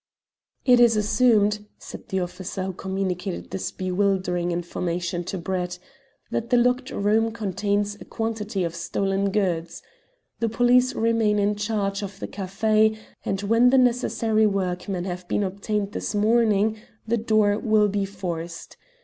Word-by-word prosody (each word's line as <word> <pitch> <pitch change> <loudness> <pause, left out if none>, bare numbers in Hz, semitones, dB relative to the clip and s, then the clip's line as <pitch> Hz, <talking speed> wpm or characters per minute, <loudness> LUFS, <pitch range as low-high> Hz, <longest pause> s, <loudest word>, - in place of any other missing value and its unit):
"It 250 -2 +6
is 235 -2 +5
assumed," 210 -1 +2
said - - -10
the 190 -2 0
officer 185 +2 -5
who 190 0 -3
communicated 190 0 -3
this 190 - -3
bewildering 185 -2 0
information 175 0 -2
to 190 - -4
Brett, 180 0 -3 0.5
"that 230 - -2
the 245 - +4
locked 250 +2 +2
room 220 +3 +1
contains 205 -1 -2
a - - -9
quantity 215 -3 -3
of 170 -1 -2
stolen 195 +3 -1
goods. 180 -5 -1 0.6
The 230 - 0
police 245 +3 +3
remain 225 -2 +2
in 205 +1 +2
charge 205 -1 -1
of 200 -1 -7
the - - -4
café, 215 +3 +1 0.3
and 195 +1 -2
when 230 +4 +4
the 265 - +4
necessary 235 -3 +2
workmen 185 -1 -2
have 180 -1 -5
been 205 - 0
obtained 200 +1 -2
this 210 - -4
morning 215 0 +2 0.3
the 235 +1 +1
door 215 -2 +2
will 215 -2 +3
be 200 0 -1
forced. 175 -4 -6
205 Hz, 145 wpm, -24 LUFS, 185-220 Hz, 0.6 s, It